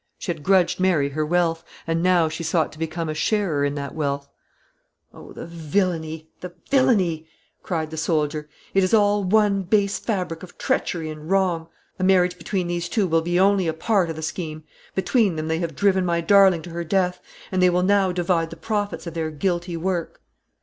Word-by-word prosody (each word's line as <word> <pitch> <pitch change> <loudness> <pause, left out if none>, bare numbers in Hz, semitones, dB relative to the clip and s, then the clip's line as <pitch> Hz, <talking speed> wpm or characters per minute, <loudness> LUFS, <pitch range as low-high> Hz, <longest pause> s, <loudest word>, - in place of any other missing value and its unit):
She 185 - -3
had 155 - -14
grudged 185 +2 +3
Mary 175 -7 +2
her 155 +2 -2
wealth, 165 0 +1 0.2
and 165 0 0
now 180 -2 +3
she 160 +2 -5
sought 160 0 0
to 155 - -14
become 165 +1 -3
a 155 - -2
sharer 170 -3 0
in 145 0 0
that 140 -1 -5
wealth. 140 -2 -2 0.9
"Oh, - - -12
the - - -8
villany, 160 -1 -2
the 180 -1 -8 0.2
villany!" 190 - +2 0.3
cried 160 -3 -3
the 160 - -6
soldier. 150 -2 -1 0.2
"It 195 - +4
is 185 +4 +3
all 205 -1 +3
one 200 0 +3
base 200 +1 +1
fabric 180 -7 -3
of 185 - -12
treachery 160 -3 -1
and 155 +1 -9
wrong. 185 -4 +1 0.3
A - - -1
marriage 180 -1 +3
between 185 +2 -2
these 175 0 -3
two 205 +1 +1
will 165 -2 +2
be 175 +2 0
only 195 -2 +3
a 160 - 0
part 190 0 +1
of 165 - -4
the 160 - -7
scheme. 155 -1 -5 0.3
Between 200 -1 +2
them 155 0 -3
they 160 0 0
have 165 -3 -3
driven 190 0 +2
my 170 -1 +1
darling 190 -1 +5
to 175 - -9
her 170 +1 -4
death, 180 +1 0 0.3
and 185 -1 +1
they 180 - +6
will 180 0 +1
now 195 -1 +3
divide 175 -2 0
the 165 - -8
profits 205 +3 -3
of 170 - -6
their 160 -1 -2
guilty 175 +2 -2
work." 175 -1 -3
175 Hz, 200 wpm, -23 LUFS, 160-190 Hz, 0.9 s, they